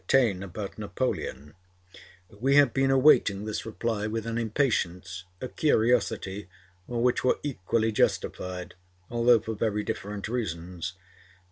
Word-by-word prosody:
Taine 115 -9 +3
about 100 +2 -6
Napoleon, 100 - -3 0.8
we 130 +7 +1
have 145 -4 +6
been 135 0 +2
awaiting 130 -7 +4
this 110 +1 -4
reply 110 -1 -2
with 110 0 -3
an 115 0 -2
impatience, 95 -7 -1
a 130 - -4
curiosity 110 - +1 0.4
which 120 0 +1
were 130 - +3
equally 115 -4 0
justified, 90 -3 -1 0.4
although 120 0 +5
for 110 +1 -5
very 105 -1 -1
different 100 0 -4
reasons, 90 -6 -4
by - - -30
M. - - -31
110 Hz, 130 wpm, -27 LUFS, 95-120 Hz, 0.8 s, have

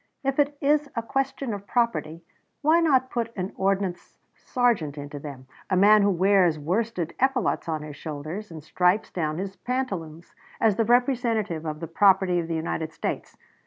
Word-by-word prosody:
If 275 +1 -1
it 290 0 +2
is 290 0 +2
a 230 - -1
question 270 0 -2
of 200 0 -7
property, 230 -9 -1 0.4
why 315 +3 +5
not 265 -6 +2
put 230 -1 -2
an 185 -1 -4
ordnance 190 -2 -1 0.2
sergeant 220 - 0
into 145 0 -7
them 140 -3 -9 0.2
a 185 - +2
man 210 +3 +6
who 200 - +3
wears 185 -3 +3
worsted 175 +2 -2
epaulets 260 -9 +1
on 155 -2 -2
his 150 -1 -9
shoulders 155 +8 -6
and 160 -3 -9
stripes 180 +6 +1
down 155 -3 -2
his 195 +1 -5
pantaloons 185 -11 -4 0.3
as 220 -3 +3
the 225 - +1
representative 230 - +1
of 155 +1 -5
the 165 - -4
property 190 0 +3
of 165 - -3
the 165 - -2
United 160 0 -3
States. - - -4
195 Hz, 170 wpm, -25 LUFS, 165-240 Hz, 0.4 s, man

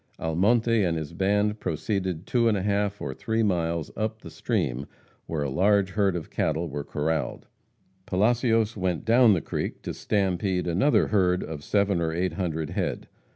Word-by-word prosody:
Almonte 110 +7 +2
and 85 -3 0
his 80 +1 -5
band 105 +3 +1
proceeded 90 +2 -2
two 120 -2 +2
and 110 -2 +3
a 95 - -2
half 100 0 0
or 65 - -3
three 110 - -1
miles 85 -5 -1
up 110 0 -2
the - - -10
stream 65 +3 -2 0.4
where 80 -3 -2
a 70 - -2
large 100 +5 +3
herd 100 -2 +1
of 85 -3 -5
cattle 80 +2 0
were 75 -1 -4
corraled. 80 +2 -2 0.6
Palacios 115 +2 +2
went 90 -3 -2
down 115 0 +6
the 85 - 0
creek - - -4
to - - -4
"stampede" 95 -2 0
another 95 - +2
herd 90 -3 +2
of 75 -2 -7
seven 100 -2 +1
or 80 -1 0
eight 90 +3 -1
hundred 80 -5 -3
head. - - -3
95 Hz, 170 wpm, -26 LUFS, 80-105 Hz, 0.6 s, down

